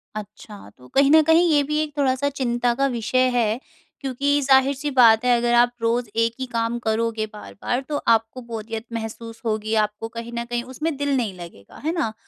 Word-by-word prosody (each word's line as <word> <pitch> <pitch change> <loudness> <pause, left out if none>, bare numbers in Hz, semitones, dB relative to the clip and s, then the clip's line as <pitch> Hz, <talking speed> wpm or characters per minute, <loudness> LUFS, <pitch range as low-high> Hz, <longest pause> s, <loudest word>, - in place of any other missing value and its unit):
अच्छा। 210 - -9
तो 125 0 -16
कहीं 275 +1 +5
न 315 - +8
कहीं 330 +2 +5
ये 290 -1 +4
भी 300 +2 -2
एक 300 -1 -8
थोड़ा-सा 275 0 +1
चिंता 240 -3 0
का 275 - +4
विषय 250 +1 +1
हैं 225 -1 +1 0.4
क्योंकि 280 +2 0
ज़ाहिर-सी 270 +1 +3
बात 235 -3 +6
हैं 245 -1 +5
अगर 240 0 +1
आप 240 0 +5
रोज़ 235 0 0
एक 230 - 0
ही 260 - -2
काम 230 +1 0
करोगे 225 -1 -1
बार-बार 210 - -4
तो, 295 - -1
आपको 225 +1 +1
बोरियत 225 0 -5
महसूस 230 0 -6
होगी 215 0 -1
आपको 210 +2 -7
कहीं 235 +1 -6
न 235 - -2
कहीं 240 0 -3
उसमें 310 +3 -2
दिल 285 -1 0
नहीं 225 -6 -1
लगेगा। 165 -13 -12
हैं 320 - 0
ना? 280 -11 -1
240 Hz, 195 wpm, -22 LUFS, 225-275 Hz, 0.4 s, न